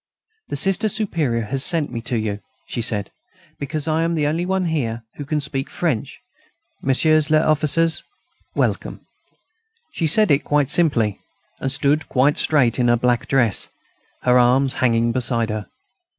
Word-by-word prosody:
"The - - -4
Sister 195 +3 +1
Superior 165 - -1
has 130 +5 -2
sent 160 -3 +1
me 115 - -5
to 120 - 0
you," 105 -2 -3 0.3
she - - -4
said, 105 -4 +1 0.5
"because 150 +1 -3
I 160 +1 +1
am 165 0 0
the 150 -2 0
only 165 +4 -1
one 190 -1 0
here 120 -9 -2
who 145 - -6
can 150 +2 -1
speak 140 -2 -3
French.... 150 -11 -3 0.6
Messieurs 155 +3 +2
les 155 0 +3
officiers, 155 +2 +2 0.5
welcome." - - -2 0.9
She 170 - -1
said 210 +3 +5
it 140 +2 +3
quite 145 -1 0
simply, 120 - +1 0.4
and 135 - -2
stood 145 +3 0
quite 140 +3 +2
straight 130 -6 +2
in 120 - +2
her 120 0 +3
black 120 0 0
dress, 120 -7 +1 0.6
her 125 0 +4
arms 130 +2 +3
hanging 115 -2 +2
beside 115 -2 -1
her. 105 -3 -5
140 Hz, 160 wpm, -20 LUFS, 120-155 Hz, 0.9 s, said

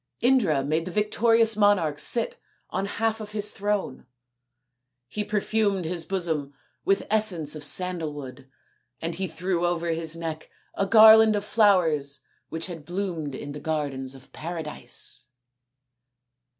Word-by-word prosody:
Indra 215 - +3
made 155 +4 -1
the 185 - -5
victorious 225 +2 +3
monarch 195 -8 +2
sit 475 - 0 0.3
on 195 +2 -2
half 225 +1 -1
of 210 0 -8
his 210 -1 0
throne; 200 -11 -3 1.0
he 210 +11 -3
perfumed 210 -2 0
his 170 0 -2
bosom 160 -7 -2 0.3
with 195 0 +1
essence 185 -9 +3
of 150 - -8
sandal 175 -1 +2
wood; 135 -2 -10 0.5
and 165 +1 -3
he 190 +3 -3
threw 175 +1 -2
over 170 -1 0
his 165 -1 -2
neck 165 -2 -6 0.2
a 195 - -1
garland 220 +1 +8
of 205 0 -2
flowers 160 - +2 0.3
which 165 0 -3
had 170 -5 -8
bloomed 170 -4 -4
in 145 +2 -7
the 150 - -7
gardens 140 -4 -3
of 130 - -17
Paradise. 160 -2 -5
175 Hz, 135 wpm, -25 LUFS, 155-210 Hz, 1.0 s, garland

